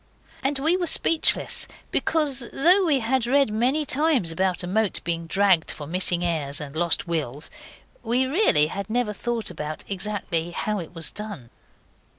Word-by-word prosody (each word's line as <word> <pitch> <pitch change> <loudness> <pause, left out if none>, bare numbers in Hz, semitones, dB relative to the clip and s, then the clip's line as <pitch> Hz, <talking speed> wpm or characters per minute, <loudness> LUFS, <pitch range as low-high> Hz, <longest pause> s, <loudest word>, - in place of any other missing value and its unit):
And 275 +1 0
we 315 +6 +2
were 360 -2 -1
speechless, 325 0 +3 0.2
because, 280 -6 +1
though 360 +8 +4
we 285 -6 +2
had 235 +1 0
read 275 -2 +2
many 260 +7 +1
times 275 - +1
about 185 +2 -1
a - - -3
moat 215 +2 0
being 170 -1 -3
dragged 190 -2 +2
for 150 - -6
missing 175 +1 +2
heirs 150 -4 -2
and 145 -1 -8
lost 170 +1 0
wills, 150 -4 -3 0.5
we 245 +3 0
really 270 - +4
had 195 +6 -6
never 230 -2 -1
thought 235 -1 -3
about 155 -2 -6
exactly 190 -4 -3
how 210 +4 -3
it 175 0 -9
was 165 -1 -4
done. 205 - -8
210 Hz, 160 wpm, -24 LUFS, 170-265 Hz, 0.5 s, though